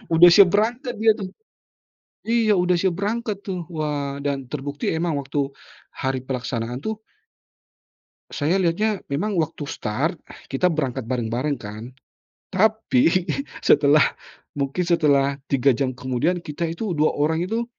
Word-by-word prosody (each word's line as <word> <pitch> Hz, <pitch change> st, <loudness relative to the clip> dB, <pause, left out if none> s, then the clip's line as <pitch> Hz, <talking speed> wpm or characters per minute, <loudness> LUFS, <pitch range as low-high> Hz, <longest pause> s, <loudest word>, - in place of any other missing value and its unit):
udah 175 Hz, +2 st, +9 dB
siap 195 Hz, 0 st, +8 dB
berangkat 235 Hz, +5 st, 0 dB
dia 220 Hz, +1 st, +5 dB
tuh. 200 Hz, -3 st, -6 dB, 1.0 s
Iya 225 Hz, -2 st, +3 dB
udah 180 Hz, 0 st, +2 dB
siap 185 Hz, -2 st, +1 dB
berangkat 210 Hz, +1 st, -2 dB
tuh. 180 Hz, -4 st, -4 dB
Wah, 145 Hz, -4 st, -3 dB
dan 135 Hz, -3 st, -3 dB
terbukti 145 Hz, 0 st, -3 dB
emang 165 Hz, 0 st, 0 dB
waktu 140 Hz, 0 st, -2 dB, 0.4 s
hari 130 Hz, -1 st, -2 dB
pelaksanaan 125 Hz, -2 st, -3 dB
tuh 220 Hz, +3 st, -3 dB, 1.3 s
Saya 155 Hz, +5 st, 0 dB
lihatnya 200 Hz, +4 st, +1 dB
memang 200 Hz, +9 st, -1 dB
waktu 155 Hz, -1 st, -3 dB
start, 105 Hz, -6 st, -2 dB, 0.3 s
kita 160 Hz, +7 st, +1 dB
berangkat 135 Hz, -5 st, -2 dB
bareng-bareng 125 Hz, +3 st, -1 dB
kan. 110 Hz, +2 st, -8 dB, 0.6 s
Tapi 185 Hz, -, +2 dB, 0.4 s
setelah 145 Hz, +1 st, +5 dB, 0.5 s
mungkin 140 Hz, +5 st, -2 dB
setelah 140 Hz, -5 st, +2 dB
3 135 Hz, 0 st, +3 dB
jam 130 Hz, +1 st, -1 dB
kemudian 130 Hz, +7 st, 0 dB
kita 165 Hz, +1 st, -3 dB
itu 180 Hz, +4 st, -3 dB
dua 155 Hz, -1 st, +2 dB
orang 160 Hz, +3 st, +1 dB
itu 225 Hz, +4 st, -1 dB
155 Hz, 130 wpm, -23 LUFS, 135-185 Hz, 1.3 s, udah